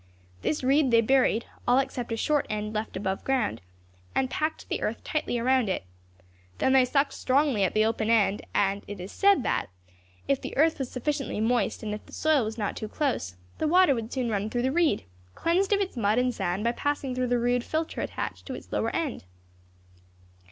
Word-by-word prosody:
This 305 - -1
reed 275 +1 +3
they 230 -1 +5
buried, 245 -1 +3 0.2
all 245 +1 +5
except 260 -3 -1
a 225 - -1
short 295 +4 +1
end 210 0 -3
left 215 -2 -3
above 190 0 -2
ground, 250 - 0 0.5
and 260 -1 +1
packed 310 +1 -2
the - - -2
earth - - -2
tightly 300 -5 -1
around 250 -2 +2
it. 185 - -1 0.7
Then 265 - +2
they 265 -1 +6
sucked 275 +3 +1
strongly 265 -5 +2
at 190 - 0
the 215 0 +4
open 225 0 0
end, 205 -3 +3
and 200 0 +1
it 205 -1 -7
is 185 +3 -7
said 400 -8 +4
that, - - 0 0.6
if 275 -1 +1
the - - -6
earth 315 +2 +3
was 265 -2 -3
sufficiently 275 -2 -2
moist 225 -1 0
and 210 -1 -3
if 210 - -6
the - - -16
soil 310 -5 +2
was 220 +1 -4
not 205 -3 -2
too 215 - -5
close, 225 - -2 0.2
the 315 - +1
water 360 -2 +5
would 230 -2 -4
soon 250 -4 -1
run 205 0 -1
through 240 +1 -1
the 260 - +1
reed, 320 -9 +2 0.3
cleansed 370 +4 +1
of 405 - +4
its 380 -6 -3
mud 215 -1 +1
and 250 0 +2
sand 180 -1 -2
by 235 - +2
passing 285 +1 -2
through 255 0 -1
the 245 0 +2
rude 245 0 +1
filter 315 +4 -2
attached - - -5
to - - -4
its - - -11
lower - - 0
end." 295 - -2
245 Hz, 210 wpm, -27 LUFS, 215-280 Hz, 0.7 s, they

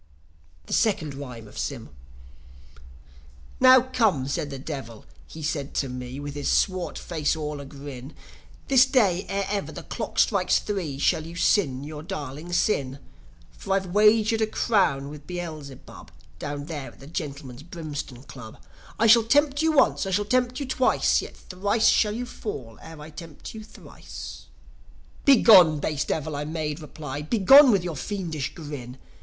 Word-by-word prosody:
THE - - -6
SECOND 195 -10 +1
RHYME 125 -5 -9
OF - - -10
SYM - - -4 1.7
"Now 255 0 +8
come," 220 - +1
said 145 +1 -2
the 135 - -6
Devil, 130 -6 -7 0.2
he 160 - -10
said 145 -2 -3
to 135 - -1
me, 125 +1 -6
With 145 0 -6
his 145 -1 -3
swart 185 -2 0
face 160 -3 -1
all 150 -2 -4
a 140 - -8
grin, 140 -1 -10 0.5
"This 265 -3 +6
day, 205 -9 +2
ere 200 0 -1
ever 200 0 -3
the - - -8
clock - - -6
strikes - - +3
three, 180 -10 -3
Shall 155 +3 +1
you 170 - -9
sin 145 -7 +1
your 150 0 -7
darling 150 +1 -7
sin. 140 -8 0 0.5
For 195 - -4
I've 190 -2 -2
wagered 215 +2 +4
a 220 - +2
crown 180 - +1
with 145 -1 -11
Beelzebub, 150 - -8 0.3
Down 145 -1 -5
there 150 -4 -7
at - - -21
the 135 - -12
Gentlemen's 140 -5 -6
Brimstone 150 -6 -7
Club, 125 -6 -11 0.4
I 225 - +2
shall 230 +1 +7
tempt 285 +5 +2
you 320 0 +3
once, 270 -8 +3
I - - -2
shall 205 +2 0
tempt 250 +3 0
you 280 - -3
twice, 260 0 +2
Yet - - -10
thrice 205 +4 +1
shall 210 -1 +3
you 245 +2 -3
fall 130 - -7
ere 160 -1 -11
I 150 +1 -10
tempt 160 -1 -10
you 220 -1 -8
thrice." 220 - -11 0.8
"Begone, 195 - +7
base 150 0 -2
Devil!" 155 -1 -3
I 145 - -3
made 155 0 -4
reply 150 -2 -7
"Begone 240 - +7
with 200 -6 +3
your 175 -3 -4
fiendish 160 -3 -4
grin! 145 -6 -8
160 Hz, 165 wpm, -25 LUFS, 140-210 Hz, 1.7 s, Now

